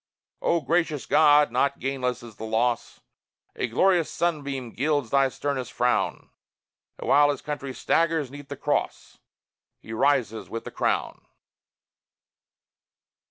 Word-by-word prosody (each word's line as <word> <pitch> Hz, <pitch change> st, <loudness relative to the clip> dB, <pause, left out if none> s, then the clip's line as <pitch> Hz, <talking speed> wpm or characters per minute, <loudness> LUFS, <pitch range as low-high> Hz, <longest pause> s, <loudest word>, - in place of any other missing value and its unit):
O 170 Hz, -, +1 dB
gracious 155 Hz, 0 st, 0 dB
God! 150 Hz, -2 st, +5 dB
not 140 Hz, +3 st, +1 dB
gainless 125 Hz, -2 st, -2 dB
is 115 Hz, -3 st, -12 dB
the -, -, -8 dB
loss: 115 Hz, +2 st, -1 dB, 0.5 s
A -, -, -1 dB
glorious 175 Hz, +7 st, +2 dB
sunbeam 140 Hz, -7 st, -2 dB
gilds 145 Hz, -2 st, -1 dB
thy 135 Hz, -1 st, +4 dB
sternest 135 Hz, -1 st, -3 dB
frown; 125 Hz, 0 st, 0 dB, 0.7 s
And -, -, -7 dB
while 145 Hz, +1 st, +5 dB
his 145 Hz, -, -2 dB
country 145 Hz, -2 st, -4 dB
staggers 160 Hz, +2 st, 0 dB
'neath 145 Hz, 0 st, -11 dB
the 140 Hz, -, -6 dB
Cross, -, -, -2 dB, 0.6 s
He 110 Hz, -, -9 dB
rises 125 Hz, -3 st, +1 dB
with 115 Hz, -, -5 dB
the -, -, -8 dB
Crown! -, -, -2 dB
140 Hz, 125 wpm, -25 LUFS, 125-150 Hz, 0.7 s, God